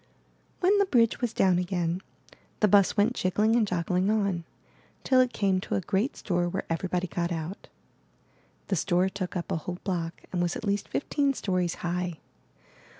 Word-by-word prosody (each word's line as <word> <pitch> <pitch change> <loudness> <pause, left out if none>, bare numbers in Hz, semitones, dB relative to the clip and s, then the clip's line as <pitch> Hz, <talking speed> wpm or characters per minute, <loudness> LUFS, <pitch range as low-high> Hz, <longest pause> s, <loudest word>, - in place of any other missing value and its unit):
When 380 +3 +4
the 400 - +3
bridge 235 - +3
was 240 -3 0
down 185 -4 +3
again, 175 -1 -1 0.6
the 210 - +4
bus 200 +1 +4
went 210 +4 +3
jiggling 210 +3 +2
and 225 -3 +3
joggling 180 +1 0
on, 200 -6 0 0.6
till 260 -1 +4
it 255 -1 +1
came 195 -4 +1
to - - -3
a - - +2
great 205 +9 -1
store 175 -2 0
where - - -3
everybody 180 +2 -1
got 170 0 -2
out. 165 +3 -5 1.0
The 195 - +2
store 180 +2 +2
took 190 -1 -5
up 175 - -3
a - - +1
whole 175 +3 -5
block 170 -3 -3
and 180 - -1
was 175 -1 0
at - - -5
least 200 0 0
fifteen 280 -1 0
stories 180 -5 -1
high. 175 -1 -2
185 Hz, 175 wpm, -28 LUFS, 175-210 Hz, 1.0 s, When